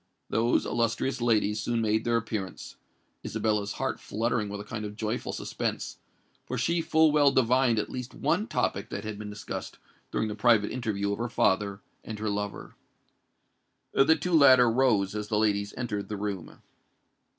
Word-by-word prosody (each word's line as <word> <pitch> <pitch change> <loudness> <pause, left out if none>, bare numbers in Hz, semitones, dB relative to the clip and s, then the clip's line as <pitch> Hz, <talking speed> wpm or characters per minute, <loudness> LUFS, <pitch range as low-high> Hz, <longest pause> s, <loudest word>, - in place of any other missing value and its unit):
Those 115 +2 +2
illustrious 115 +3 -1
ladies 110 -3 +2
soon 120 +1 -1
made 110 0 +1
their 120 0 +2
appearance—Isabella's 105 0 -4
heart - - -2
fluttering 110 0 -1
with 100 0 -5
a - - -6
kind 105 +1 -6
of 105 0 -6
joyful 110 +2 -3
suspense, - - -4 0.5
for 125 - -3
she 165 +8 +1
full 160 -1 +4
well 145 -2 +5
divined 125 -2 +3
at 105 - -1
least 125 -1 -6
one - - 0
topic - - -1
that - - -5
had 105 -1 -5
been 105 -1 -6
discussed 105 0 -6 0.3
during 110 - -1
the 105 - -3
private 110 -1 +3
interview 105 -5 -2
of 100 - -3
her 120 +1 -2
father 100 -1 +1 0.2
and 110 - -6
her 105 0 -2
lover. 105 0 -4 1.2
The 150 +4 +5
two 180 +1 -3
latter 130 -6 +7
rose 115 -6 +2
as 105 -1 -4
the 105 - 0
ladies 100 -1 +1
entered 105 -5 -3
the 105 - -3
room. 100 -4 -5
110 Hz, 165 wpm, -28 LUFS, 105-120 Hz, 1.2 s, latter